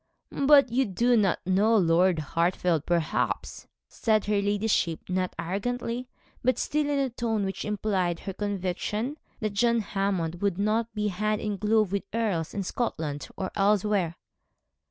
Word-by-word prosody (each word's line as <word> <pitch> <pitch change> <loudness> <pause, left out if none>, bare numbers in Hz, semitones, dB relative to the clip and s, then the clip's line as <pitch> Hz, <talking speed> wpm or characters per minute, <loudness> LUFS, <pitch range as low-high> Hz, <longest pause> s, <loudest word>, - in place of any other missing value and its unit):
'But 280 -3 +5
you 260 +3 +2
do 235 +6 +2
not 200 -6 +1
know 205 +5 +3
Lord 175 -1 +3 0.2
Hartfield, 170 -2 +1
perhaps,' 170 -3 -1 0.2
said 215 -2 +1
her 205 -1 +1
ladyship, 200 -5 +1
not 185 0 -1
arrogantly, 240 +6 -3 0.3
but 255 -1 +2
still 300 0 0
in 290 - +1
a 270 -2 0
tone 225 -3 -1
which 195 - -4
implied 195 -5 -1
her 195 - -5
conviction 205 - -2 0.2
that 215 -2 -1
John 235 +2 +2
Hammond 195 -5 -2
would 200 -3 0
not 215 +3 0
be 210 0 0
hand 210 +3 -1
in 210 -2 -3
glove 215 -1 +2
with 200 -1 -1
earls, 200 -9 -1
in 200 - -1
Scotland 160 -9 -3
or 190 - -3
elsewhere. 200 -4 +2
205 Hz, 150 wpm, -27 LUFS, 185-225 Hz, 0.3 s, But